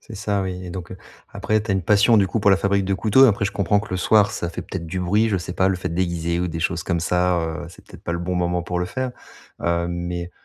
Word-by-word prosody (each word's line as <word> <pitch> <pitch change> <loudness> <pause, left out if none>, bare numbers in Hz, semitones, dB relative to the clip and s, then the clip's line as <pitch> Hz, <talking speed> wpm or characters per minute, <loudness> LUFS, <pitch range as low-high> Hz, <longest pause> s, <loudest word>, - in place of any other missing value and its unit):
C'est 110 - -12
ça 100 -1 -1
oui, 90 -1 -5
et 90 - -7
donc, 90 0 -7
heu, - - -8 0.3
après 110 0 0
tu 110 - -5
as - - +2
une 95 - 0
passion 105 +5 +4
du 100 - +4
coup 115 - -1
pour 100 - +4
la 95 - +6
fabrique 100 0 +1
de 95 0 0
couteaux. 110 +7 +5
Après 100 -4 +2
je 95 - 0
comprends 100 +1 +1
que 110 - -9
le 95 - -1
soir, 105 +2 +4
ça 85 - -3
fait - - -6
peut-être 85 -3 -6
du 90 +3 -3
bruit, 105 +5 +2
je 100 - +1
sais 90 0 -6
pas, 95 0 +2
le 95 - +1
fait 90 - -4
d'aiguiser 85 -1 -1
ou 90 - 0
des 85 0 -4
choses 85 0 -1
comme 85 -2 0
ça, 90 +1 +1
heu, 80 +1 -4
c'est - - -16
peut-être - - -14
pas 85 - -2
le 85 - -2
bon 90 +1 -2
moment 90 0 0
pour 90 0 -3
le 90 - -1
faire. 130 +5 -3 0.5
Hem, 85 0 0
mais 85 0 -4
90 Hz, 300 wpm, -22 LUFS, 85-100 Hz, 0.5 s, la